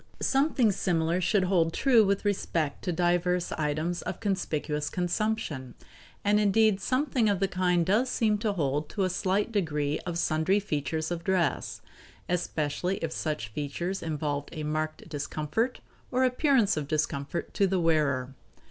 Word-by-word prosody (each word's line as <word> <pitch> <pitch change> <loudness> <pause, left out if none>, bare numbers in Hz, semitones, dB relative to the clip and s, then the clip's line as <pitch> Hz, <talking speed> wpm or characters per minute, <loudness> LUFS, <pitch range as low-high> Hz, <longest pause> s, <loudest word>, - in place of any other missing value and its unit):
Something 270 -5 +2
similar 170 -2 0
should 190 +2 +2
hold 175 -3 +2
true 245 -5 +5
with 200 0 0
respect 165 -7 -1
to 180 - 0
divers 175 +1 +1
items 155 +3 -1
of - - -5
conspicuous 155 -7 -1
consumption, 175 - -2 0.5
and 210 +1 +3
indeed 210 -1 +3
something 255 -2 +1
of 200 -3 +1
the 195 - +2
kind 180 -2 +1
does 220 +8 +2
seem 215 -4 +1
to 210 -1 0
hold 150 -3 -1
to 200 - -1
a 185 - +1
slight 195 +4 0
degree 150 -8 0
of 175 -2 -4
sundry 170 +4 +2
features 160 -3 -2
of 170 -1 -3
dress, 185 -1 0 0.5
especially 175 +1 -1
if 165 -1 -3
such 150 -10 -3
features 150 - -3
involve 150 -3 -2
a 155 -2 -5
marked 155 +1 -3
discomfort 155 - -2 0.3
or 255 +1 +1
appearance 255 -4 +3
of 150 -2 -3
discomfort 150 +1 -2
to 200 - +3
the 190 0 +1
wearer. 145 -6 +1
175 Hz, 150 wpm, -28 LUFS, 155-205 Hz, 0.5 s, true